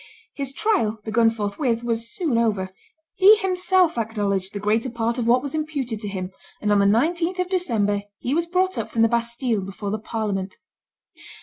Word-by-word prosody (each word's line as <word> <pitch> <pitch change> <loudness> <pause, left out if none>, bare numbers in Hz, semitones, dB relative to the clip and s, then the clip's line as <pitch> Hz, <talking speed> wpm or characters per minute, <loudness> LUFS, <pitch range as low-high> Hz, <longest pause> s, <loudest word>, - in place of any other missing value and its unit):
His 275 -2 -4
trial, 275 - +1
begun 225 +1 +3
forthwith, 225 +3 -2
was 230 -1 -1
soon 325 - 0
over; 205 -5 0 0.4
he 405 +2 +7
himself 370 - +2
acknowledged 200 -4 -1
the 205 - -5
greater 220 +5 0
part 235 +1 -2
of 230 - -1
what 250 +2 +4
was 285 - -5
imputed 290 -8 -3
to 210 - -5
him; 190 -2 -4 0.3
and 210 - 0
on 205 - +4
the 200 - +4
19th 335 - +1
of 365 0 -1
December 220 - 0 0.2
he 250 - -2
was 335 +2 0
brought 370 +2 0
up - - -4
from 225 - +1
the - - +6
Bastille 235 -1 -1
before 195 +1 -5
the 215 - -2
parliament. 205 -4 -3
230 Hz, 185 wpm, -23 LUFS, 210-315 Hz, 0.4 s, he